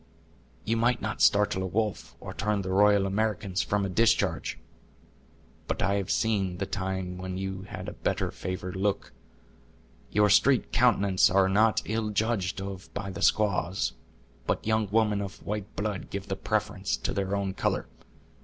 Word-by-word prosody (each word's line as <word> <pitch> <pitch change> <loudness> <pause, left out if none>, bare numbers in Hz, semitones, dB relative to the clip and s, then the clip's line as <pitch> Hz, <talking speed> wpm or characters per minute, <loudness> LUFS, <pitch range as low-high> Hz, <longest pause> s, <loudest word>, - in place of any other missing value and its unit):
"You 115 +1 +1
might 120 +2 +2
not 110 - -4
startle 100 -2 +4
a 95 - -1
wolf, 105 +2 -2
or - - -7
turn 105 -2 -1
the 95 - -3
Royal 100 0 +5
Americans 100 -1 0
from 100 -1 0
a - - -2
discharge; 115 +5 +1 1.1
but - - -1
I 100 - +2
have 100 -1 -3
seen 100 -5 +1
the 100 - -2
time 95 -2 -3
when 95 0 -4
you 95 0 -5
had 95 -2 -7
a - - -5
better - - -1
favored 90 0 -5
look; 100 +1 -1 1.0
your 105 0 +4
streaked 130 +5 +4
countenances 100 -6 +4
are 95 +1 +4
not 105 +3 +3
ill 110 0 -1
judged 105 -3 0
of 95 -4 -7
by 100 -1 -4
the 90 - -7
squaws, 95 -3 +1 0.5
but - - -1
young 110 -1 +1
women 105 -1 +2
of 100 -1 -7
white 105 -1 -4
blood 105 -3 -3
give 100 0 -6
the 95 - -1
preference 105 -1 -1
to - - -3
their 100 0 -1
own 100 -1 -1
color. - - -1
100 Hz, 165 wpm, -28 LUFS, 95-105 Hz, 1.1 s, Royal